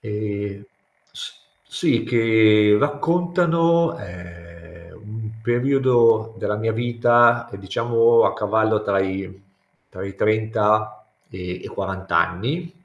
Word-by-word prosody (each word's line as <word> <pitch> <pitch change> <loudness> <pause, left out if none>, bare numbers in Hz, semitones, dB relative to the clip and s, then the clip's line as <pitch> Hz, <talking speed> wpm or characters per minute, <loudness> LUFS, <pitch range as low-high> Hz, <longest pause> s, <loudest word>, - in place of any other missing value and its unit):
Ehm, 105 -2 -5 0.5
s - - -10 0.3
sì, - - 0
che 110 -3 +4
raccontano, 170 +2 +1
ehm, 85 -1 -13
un 110 +1 -8
periodo 120 -3 +2
della 105 - -3
mia 115 +1 -2
vita, 120 0 +2
diciamo, 115 +4 +2
a - - +1
cavallo 110 +1 0
tra 100 -2 0
i 95 0 -5 0.5
tra 95 - -9
i 100 - -9
30 110 0 0 0.2
e 95 - -10
i 90 0 -7
40 95 -2 -4
anni. 115 - -2
110 Hz, 105 wpm, -21 LUFS, 100-120 Hz, 0.5 s, che